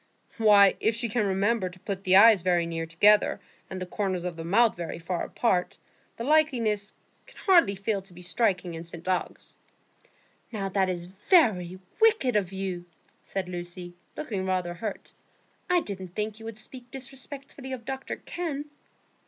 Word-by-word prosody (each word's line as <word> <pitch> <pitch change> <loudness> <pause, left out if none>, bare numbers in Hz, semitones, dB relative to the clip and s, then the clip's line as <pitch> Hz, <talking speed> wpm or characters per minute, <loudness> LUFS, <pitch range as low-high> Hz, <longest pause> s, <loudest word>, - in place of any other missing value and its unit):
"Why, 205 -3 +6
if 220 0 +1
she 235 0 -2
can 215 -1 0
remember 195 +1 +1
to 180 +1 -15
put 195 0 -5
the 185 0 +5
eyes 210 -1 +8
very 175 -1 +2
near 165 -1 -4
together, 205 +6 +4 0.3
and 185 - -5
the 185 - -4
corners 185 -1 -2
of 180 -1 -4
the 165 - -6
mouth 215 +7 +3
very 170 -2 -5
far 170 +1 -3
apart, 185 -7 0 0.4
the 230 - -4
likeness 235 -9 +1 0.3
can - - -17
hardly 340 - +5
fail 200 +1 -1
to 190 -1 -18
be 180 - -10
striking 185 -3 0
in 165 0 -6
St 170 +1 -10
Ogg's." 185 -1 -3 0.9
"Now 200 -4 -3
that 190 -1 +1
is 175 -1 -3
very 190 - +2 0.2
wicked 435 - +4
of 195 -3 +1
you," 190 -2 -4 0.4
said 195 -2 -4
Lucy, 175 0 -7 0.2
looking 205 -10 -3
rather 185 -2 -1
hurt. 205 +4 -6 0.6
"I 360 -1 +4
didn't 190 - -7
think 215 0 -3
you 225 - -11
would 225 -1 -7
speak 245 +2 -11
disrespectfully 270 +1 -9
of 250 -3 -6
Dr 265 +1 -4
Kenn." 310 -5 -5
200 Hz, 170 wpm, -27 LUFS, 180-235 Hz, 0.9 s, eyes